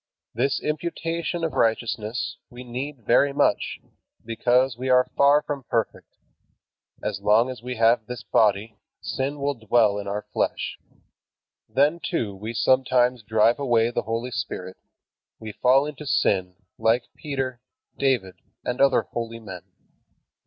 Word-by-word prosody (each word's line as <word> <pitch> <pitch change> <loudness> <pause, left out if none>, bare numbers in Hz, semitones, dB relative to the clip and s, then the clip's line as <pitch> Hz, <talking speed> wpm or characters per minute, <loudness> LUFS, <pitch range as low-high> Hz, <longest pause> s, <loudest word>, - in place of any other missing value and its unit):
This 135 +4 0
imputation 165 +2 -3
of 160 - -1
righteousness 115 0 -1
we 120 +1 -10
need 125 0 -6
very 140 +5 +4
much, - - +1 0.5
because 120 +2 +2
we 130 +2 -4
are 125 0 +4
far 140 +1 +5
from 145 -2 -4
perfect. 115 -2 -2 0.9
As 100 -2 -3
long 110 +5 +3
as 125 -3 -9
we 125 +1 -5
have 115 -1 +3
this 125 -1 -6
body, 110 0 +1 0.2
sin 140 +2 -3
will 140 +1 0
dwell 110 -3 +2
in 100 - -6
our 105 +1 -3
flesh. - - -1 0.9
Then, 145 +8 +2
too, 115 - -2
we 110 +4 -6
sometimes 125 0 +3
drive 110 +3 +2
away 120 -4 +2
the - - -1
Holy 115 +3 -3
Spirit; 95 -4 -5 0.6
we 110 -1 -7
fall 130 +6 +3
into 150 0 -7
sin, 90 -7 +1 0.2
like 115 +2 +3
Peter, 135 -4 -4 0.3
David, 125 -9 0 0.2
and 125 +2 -2
other 140 0 +4
holy 115 -1 -5
men. 95 -5 -9
120 Hz, 140 wpm, -24 LUFS, 110-135 Hz, 0.9 s, far